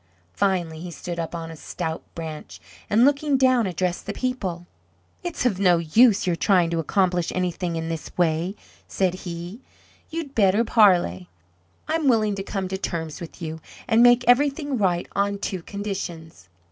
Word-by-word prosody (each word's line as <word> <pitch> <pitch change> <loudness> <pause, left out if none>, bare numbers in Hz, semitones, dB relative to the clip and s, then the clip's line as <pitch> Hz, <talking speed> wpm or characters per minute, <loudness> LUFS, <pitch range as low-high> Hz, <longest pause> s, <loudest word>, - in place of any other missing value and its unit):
Finally 175 -5 0
he 175 +2 -7
stood 170 0 -6
up 165 +1 -4
on 165 -1 -6
a - - -8
stout 160 +1 -5
branch, 160 -2 -7 0.3
and, 225 +4 +5
looking 285 0 +2
down, 255 -4 +3
addressed 180 +1 -2
the 200 - -2
people. 195 -10 -3 0.6
"It's 350 -7 -3
of 205 -7 +1
no 180 -3 +5
use, 205 +7 +4
your 175 -2 +1
trying 175 -1 +2
to 165 - 0
accomplish 180 +1 +1
anything 180 -1 -2
in 165 0 -3
this 165 -1 -5
way," 170 +2 +1 0.3
said 185 -2 0
he; 175 +4 -7 0.5
"you'd 320 -4 -5
better 205 0 +3
parley. 175 - +3 0.6
I'm 320 -2 0
willing 215 -4 +3
to 195 - -4
come 195 -1 -3
to 190 0 -3
terms 160 -4 -4
with 170 +1 -9
you, 160 0 -5 0.3
and 230 -1 +4
make 245 0 +5
everything 285 +3 +3
right 180 -3 +1
on 200 0 +1
two 190 -2 -4
conditions." 175 - -6
185 Hz, 165 wpm, -24 LUFS, 170-225 Hz, 0.6 s, and